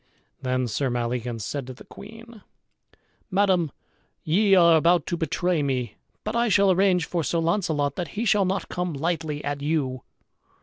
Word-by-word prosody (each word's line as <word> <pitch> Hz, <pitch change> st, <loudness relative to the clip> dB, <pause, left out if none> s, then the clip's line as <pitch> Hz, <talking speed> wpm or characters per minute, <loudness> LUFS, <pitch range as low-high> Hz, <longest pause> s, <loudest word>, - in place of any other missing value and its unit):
Then 130 Hz, -1 st, -1 dB
Sir 130 Hz, +4 st, -1 dB
Maleagans 120 Hz, -1 st, -3 dB
said 140 Hz, -3 st, -4 dB
to 130 Hz, -, -8 dB
the -, -, -13 dB
queen, 225 Hz, +1 st, -13 dB, 0.9 s
"Madam, 185 Hz, -5 st, +2 dB, 0.5 s
ye 195 Hz, +5 st, +3 dB
are 170 Hz, -2 st, +6 dB
about 170 Hz, 0 st, +3 dB
to 175 Hz, -, -2 dB
betray 170 Hz, 0 st, 0 dB
me, 125 Hz, -6 st, -2 dB, 0.3 s
but 215 Hz, +2 st, -3 dB
I 235 Hz, 0 st, +2 dB
shall 200 Hz, -1 st, +4 dB
arrange 185 Hz, -2 st, +3 dB
for 170 Hz, 0 st, -2 dB
Sir 170 Hz, -, -1 dB
Launcelot 165 Hz, -5 st, 0 dB
that 175 Hz, -2 st, -2 dB
he 230 Hz, -, -1 dB
shall 205 Hz, -2 st, +3 dB
not 190 Hz, +2 st, -2 dB
come 180 Hz, -1 st, -3 dB
lightly 155 Hz, 0 st, -2 dB
at 145 Hz, 0 st, -3 dB
you." 140 Hz, -4 st, -1 dB
165 Hz, 165 wpm, -25 LUFS, 140-190 Hz, 0.9 s, are